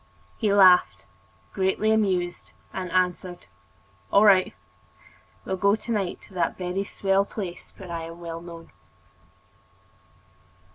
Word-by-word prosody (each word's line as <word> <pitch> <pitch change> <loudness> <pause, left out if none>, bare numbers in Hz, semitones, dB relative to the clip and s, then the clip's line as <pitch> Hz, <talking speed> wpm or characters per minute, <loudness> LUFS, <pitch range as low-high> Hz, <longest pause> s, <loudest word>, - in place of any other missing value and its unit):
He 215 -3 0
laughed, 180 - +5 0.5
greatly 195 +3 +1
amused, 185 -5 -1 0.2
and 185 -1 -4
answered: 180 0 -1 0.7
"All 200 +2 +5
right, 190 -3 +5 0.9
we - - -11
will 190 - 0
go 200 +2 +3
to 220 +2 -7
night 200 -5 -2
to 185 -3 -3
a - - +1
very 185 +1 -2
swell 195 0 +1
place 195 -3 -7
where 185 -3 -10
I 165 -1 -4
am 165 +1 -10
well 165 -1 -7
known." 170 -1 -11
185 Hz, 130 wpm, -25 LUFS, 175-200 Hz, 0.9 s, laughed